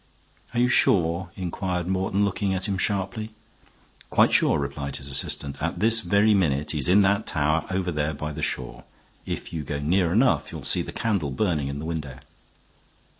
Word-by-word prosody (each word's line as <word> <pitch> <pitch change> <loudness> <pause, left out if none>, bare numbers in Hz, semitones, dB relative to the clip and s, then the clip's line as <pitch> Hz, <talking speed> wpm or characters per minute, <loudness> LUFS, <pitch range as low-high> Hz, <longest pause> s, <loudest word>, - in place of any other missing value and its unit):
"Are - - +1
you 125 - +4
sure?" 95 -8 +2
inquired 90 -1 -3
Morton, 95 +2 0
looking 100 0 -1
at 95 +2 -2
him 100 - -1
sharply. 100 +2 -1 0.8
"Quite - - +4
sure," - - +3
replied 70 -1 -4
his 70 +1 -6
assistant. 70 +1 -1
"At 85 +2 -2
this 115 +3 +4
very 105 +1 +3
minute 75 -7 +1
he 75 - -2
is 70 - -1
in 100 +3 +6
that 100 +2 +1
tower 75 0 0
over 95 -1 -1
there 75 -1 -1
by 75 +2 -4
the 75 +1 -6
shore. - - -3 0.4
If - - -5
you 80 - -3
go 70 0 -4
near 85 +4 +1
enough 125 +7 +2
you'll - - -7
see - - +4
the - - -6
candle 100 -10 -1
burning 75 -1 -1
in 70 +1 -4
the 75 - -6
window." 75 -6 -5
90 Hz, 185 wpm, -25 LUFS, 75-100 Hz, 0.8 s, in